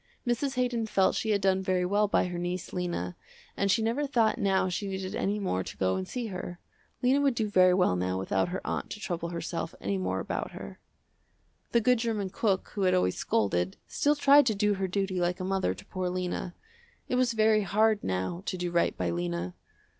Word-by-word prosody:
Mrs. 260 +3 0
Haydon 245 -3 0
felt 195 -3 +3
she 220 - -2
had 205 -2 +2
done 190 -1 +2
very 185 -1 +1
well 205 +3 +2
by 205 - +2
her 180 -1 -4
niece, 175 0 -4
Lena, 175 - -3 0.4
and 200 - 0
she 210 +4 +3
never 250 +6 0
thought 235 -4 +2
now 195 -3 +2
she 185 +3 -3
needed 190 -1 -4
any 200 +2 0
more 140 - -1
to - - -9
go 95 0 +1
and 95 0 -3
see 245 -2 -4
her. 180 -1 -6 0.5
Lena 265 +3 +4
would 275 -3 +2
do 220 -2 0
very 185 -3 +5
well 180 - +3
now 90 +1 -1
without 95 - 0
her 185 +1 -5
aunt - - -3
to 210 - -6
trouble 170 -4 -3
herself 165 -1 -4
any 100 0 -1
more 95 0 -1
about - - -4
her. 65 - -9 0.9
The 235 - +3
good 250 +1 +3
german 215 -5 -1
cook 195 -2 0
who 205 - -5
had 185 -1 +3
always 90 - +2
scolded, 95 -4 0
still 295 +1 +2
tried 285 -1 +6
to 220 - +2
do 210 +1 +2
her 190 -1 -1
duty 190 0 -1
like 175 0 0
a - - -3
mother 190 0 0
to - - -13
poor 185 -1 -3
Lena. 180 0 -3 0.5
It - - -4
was 250 -1 +2
very 215 -1 +4
hard 215 +1 +2
now 95 - -2
to 185 - -2
do 175 -1 -2
right 170 0 +1
by 90 -1 -1
Lena. 85 +1 -3
190 Hz, 215 wpm, -29 LUFS, 170-220 Hz, 0.9 s, tried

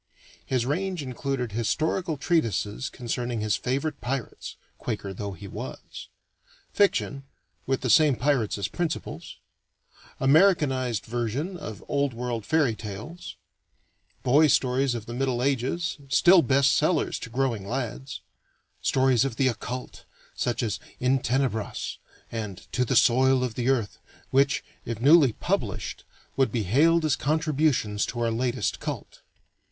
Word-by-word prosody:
His 125 -3 0
range 180 +4 -1
included 130 -2 -3
historical 155 - -1
treatises 115 - 0
concerning 120 -1 -3
his 105 -2 +1
favorite 140 +4 -2
Pirates 125 -1 -4 0.2
(Quaker 105 -4 -4
though 100 +1 -5
he 85 - -10
was); - - -8 0.6
fiction, 140 -8 +1 0.4
with 135 0 0
the 125 - -1
same 150 -4 +6
Pirates 125 -5 +1
as 100 - -1
principals; 175 -2 -4 0.8
Americanized 135 - +3
version 120 - -2
of 110 - -8
Old 140 -3 0
World 120 -3 -4
fairy 155 -7 +3
tales; 110 - -8 0.9
boy 145 +5 +5
stories 130 -1 +2
of 115 -3 -5
the 120 - -7
Middle 125 -1 0
Ages, 140 +5 -1
still 175 +6 +6
best 140 -2 +3
sellers 155 +1 +1
to 115 - -7
growing 120 -5 -1
lads; 130 +2 -4 0.6
stories 130 -2 +3
of 135 -4 -2
the 130 +2 +2
occult, 125 +2 -6 0.3
such 120 0 -1
as 110 - -2 0.2
In 130 +2 +2
Tenebras 125 -4 -2 0.3
and 105 -5 -4
To 125 - +1
the 125 +1 -1
Soil 130 +2 +4
of 125 -3 -2
the 120 +2 -1
Earth, 120 -6 0 0.3
which, 140 +3 +3 0.2
if 115 -2 -5
newly 140 -1 +6
published, - - -3 0.3
would 135 -1 +2
be 115 -3 -1
hailed 155 - +3
as 150 - +2
contributions 150 -8 +1
to 120 - -5
our 115 -1 +1
latest 120 -2 -1
cult. - - -6
130 Hz, 135 wpm, -26 LUFS, 115-140 Hz, 0.9 s, same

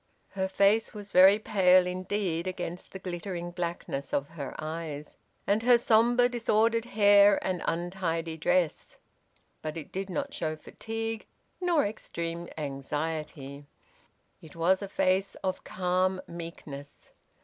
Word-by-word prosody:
Her 190 -1 -2
face 200 +4 +2
was 205 -1 -8
very 190 +3 +8
pale 185 -4 +4
indeed 185 -1 -2
against 180 -1 -5
the - - -6
glittering 175 -1 -5
blackness 170 -5 -4
of 140 0 -1
her 145 -5 -7
eyes, 155 -2 -5 0.3
and 205 +2 +2
her 245 +1 +6
sombre 240 +2 +4
disordered 230 -1 +2
hair 205 -2 +6
and 185 -2 -1
untidy 165 -1 -2
dress; 175 0 0 0.6
but 155 +1 -4
it 155 - -8
did 195 +1 -4
not 280 +8 -3
show 155 -1 -2
fatigue 225 +6 -5 0.3
nor 345 -4 +3
extreme 170 -5 -5
anxiety; 145 0 -4 0.7
it 160 - -14
was 180 +4 +2
a 200 - -4
face 190 0 +1
of 185 0 -2
calm 185 +1 0
meekness. 155 -4 -9
185 Hz, 125 wpm, -29 LUFS, 165-205 Hz, 0.7 s, very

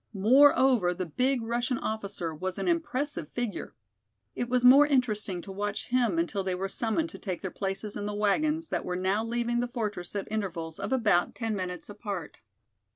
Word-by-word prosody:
Moreover, 245 -3 +5
the 185 0 -3
big 250 - 0
Russian 240 +2 -1
officer 200 -8 -3
was 185 +4 -3
an - - -2
impressive 295 - -1
figure. 240 -5 -4 0.6
It 245 - -3
was 250 0 +2
more 275 +4 +8
interesting 215 - 0
to 195 - -8
watch 205 +1 -3
him 240 -8 +2
until 185 +4 0
they 185 -1 -1
were 190 +2 -2
summoned 240 +11 -1
to - - -10
take 185 -4 -4
their 190 - -3
places 195 +1 -4
in 205 0 -3
the 210 - -3
wagons 305 +11 +1
that - - -1
were 180 - -3
now 190 +4 0
leaving 240 +1 -1
the 245 - 0
fortress 210 -7 -4
at 200 - -3
intervals 170 -7 -3
of - - -4
about 210 -9 +2
ten 225 -2 -2
minutes 180 -3 -5
apart. 200 -5 -6
210 Hz, 185 wpm, -28 LUFS, 190-245 Hz, 0.6 s, more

